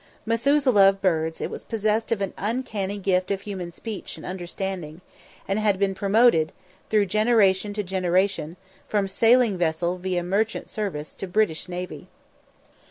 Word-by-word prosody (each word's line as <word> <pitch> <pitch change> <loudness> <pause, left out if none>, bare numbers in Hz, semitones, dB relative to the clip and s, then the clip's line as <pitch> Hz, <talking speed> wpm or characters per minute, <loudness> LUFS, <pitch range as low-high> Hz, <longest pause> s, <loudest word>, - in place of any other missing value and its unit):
Methuselah 230 -3 +4
of 195 0 -3
birds, 160 -4 0
it - - -3
was - - -7
possessed 220 0 -1
of 220 -3 0
an 195 - -2
uncanny 210 -3 -2
gift 185 -2 0
of 195 -1 -1
human 185 -4 -6
speech 215 +4 -7
and - - -10
understanding, 180 -2 -5 0.5
and 195 +2 0
had 210 -2 +2
been 195 0 +1
promoted 200 -4 +3 0.4
through 210 -2 +3
generation 210 -1 +3
to 210 0 -2
generation, 185 -2 0 0.3
from 205 -2 0
sailing 225 -1 +3
vessel 170 +2 0
via 180 -1 -1
Merchant 200 +5 -1
Service 190 -9 -4
to 195 - -6
British 180 -3 0
Navy. 180 0 -6
195 Hz, 150 wpm, -24 LUFS, 180-215 Hz, 0.5 s, Methuselah